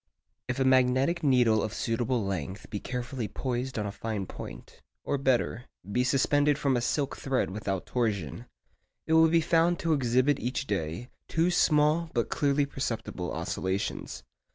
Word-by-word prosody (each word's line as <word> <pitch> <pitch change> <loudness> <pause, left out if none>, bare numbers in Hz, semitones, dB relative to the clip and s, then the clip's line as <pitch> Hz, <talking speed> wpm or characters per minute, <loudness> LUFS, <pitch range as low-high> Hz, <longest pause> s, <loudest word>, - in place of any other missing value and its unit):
If 130 +1 -2
a - - +3
magnetic 130 +6 +3
needle 125 -6 +4
of 110 0 -3
suitable 115 -1 -1
length 95 0 -4
be 105 - -3
carefully 125 -1 -4
poised 125 +3 -3
on 105 - -1
a 100 - -3
fine 105 -1 -4
point,—or 140 +8 -7
better, 125 -2 +1 0.3
be 125 +4 +2
suspended 145 +3 +3
from 140 -3 +1
a 120 - +1
silk 140 +3 -1
thread 135 -7 -1
without 95 -2 -3
torsion,—it 100 - -4
will 160 0 +6
be 165 +1 +4
found 165 +2 +3
to 165 -1 +1
exhibit 130 +1 +2
each 130 +2 -2
day 95 - -3 0.2
two 165 +2 +1
small 155 0 +3
but 115 - +1
clearly 145 0 +2
perceptible 115 -9 -4
oscillations. 95 +4 -3
125 Hz, 150 wpm, -28 LUFS, 110-145 Hz, 0.3 s, will